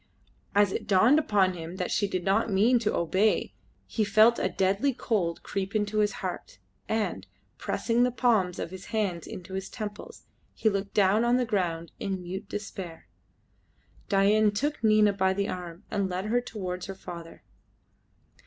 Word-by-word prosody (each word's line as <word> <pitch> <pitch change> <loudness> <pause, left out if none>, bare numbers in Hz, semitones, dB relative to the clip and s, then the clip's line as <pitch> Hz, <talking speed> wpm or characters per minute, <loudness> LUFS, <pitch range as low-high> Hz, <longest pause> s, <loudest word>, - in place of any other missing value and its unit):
As 205 -1 +4
it - - -4
dawned 220 +9 +5
upon 200 -9 +2
him 170 0 -7
that 185 -1 -3
she 205 - +1
did 185 -2 -3
not 200 +5 +2
mean 220 +5 +4
to 215 -2 0
obey 190 +6 +1 0.3
he 220 - -1
felt 215 +3 +5
a 185 - +1
deadly 195 +8 +1
cold 175 -10 -1
creep 195 +1 -4
into 210 0 0
his 210 0 +3
heart, - - -5 0.3
and, 195 - -1 0.3
pressing 230 +4 0
the 250 - +4
palms 225 -8 +1
of - - -4
his 190 0 -9
hands 195 -7 -2
to 185 +1 -8
his 190 0 -4
temples, 210 -3 -7 0.3
he 220 - +2
looked 200 -1 -3
down 205 +2 +4
on 240 +1 +3
the 250 - +1
ground 170 -6 -1
in 190 -2 -3
mute 190 +3 -6
despair. 190 -5 -7 1.0
Dain 210 +2 +4
took 245 +6 -2
Nina 215 -1 +5
by 190 -1 +2
the 200 +1 -1
arm 180 -1 -6
and 200 -2 0
led 185 +2 -3
her 240 +3 +1
towards 185 -6 -5
her 195 - -6
father. 170 -3 -10
200 Hz, 170 wpm, -28 LUFS, 185-215 Hz, 1.0 s, dawned